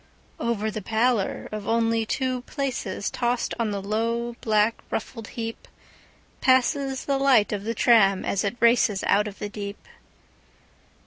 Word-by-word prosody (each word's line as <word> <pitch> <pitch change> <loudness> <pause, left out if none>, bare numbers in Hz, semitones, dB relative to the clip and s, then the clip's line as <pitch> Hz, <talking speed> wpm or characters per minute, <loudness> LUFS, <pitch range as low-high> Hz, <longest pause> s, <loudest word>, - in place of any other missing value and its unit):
Over 220 -2 -1
the 215 0 -5
pallor 225 0 0
of 210 -1 -5
only 225 -1 +1
two 255 0 -1
placesTossed 245 -2 -2
on 230 -2 +1
the 200 -1 -3
low, 230 +3 -1
black, 215 0 +2
ruffled 225 0 -5
heapPasses 260 +3 -2
the 275 -1 0
light 260 -6 +4
of 200 -1 -3
the 230 +1 -2
tram 200 -6 +4
as 195 - 0
it 210 +4 -3
racesOut 210 -3 +3
of 200 - -8
the 210 - -4
deep. 205 -1 -7
225 Hz, 130 wpm, -25 LUFS, 210-240 Hz, -, light